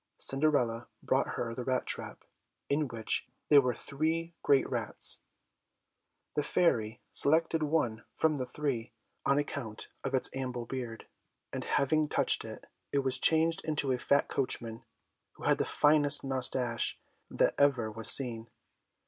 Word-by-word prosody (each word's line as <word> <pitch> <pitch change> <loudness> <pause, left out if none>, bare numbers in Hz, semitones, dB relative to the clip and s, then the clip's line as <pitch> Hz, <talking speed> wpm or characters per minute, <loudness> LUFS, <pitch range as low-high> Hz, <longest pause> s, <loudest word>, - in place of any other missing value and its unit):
Cinderella 135 -5 +1 0.2
brought - - 0
her 115 -1 -3
the 125 - -5
rat 130 0 -1
trap, - - -2 0.4
in 145 +1 0
which 115 -3 -1 0.2
there 145 -2 +7
were 125 -2 -1
three 165 +4 -2
great 140 -2 +3
rats. - - 0 1.2
The 150 - +1
Fairy 120 -8 0
selected 160 +2 +3
one 145 -8 -1
from 155 -2 +1
the 130 -2 -4
three, 125 -5 -4 0.3
on 140 - +3
account 135 -7 -4
of 135 0 -1
its 130 - +1
ample 125 -2 -4
beard, 120 -2 -6 0.5
and - - -4
having 155 +3 +1
touched - - +3
it, - - -9 0.3
it 140 -1 0
was 130 -1 0
changed 165 +1 +5
into 150 -4 0
a 125 - -1
fat 140 +3 +1
coachman, 115 -4 -2 0.5
who - - -15
had - - +2
the - - +1
finest 145 -1 +3
moustaches 130 -3 -1 0.3
that - - +1
ever 130 -6 +2
were 115 +1 -8
seen. 115 -2 +3
135 Hz, 145 wpm, -30 LUFS, 120-150 Hz, 1.2 s, there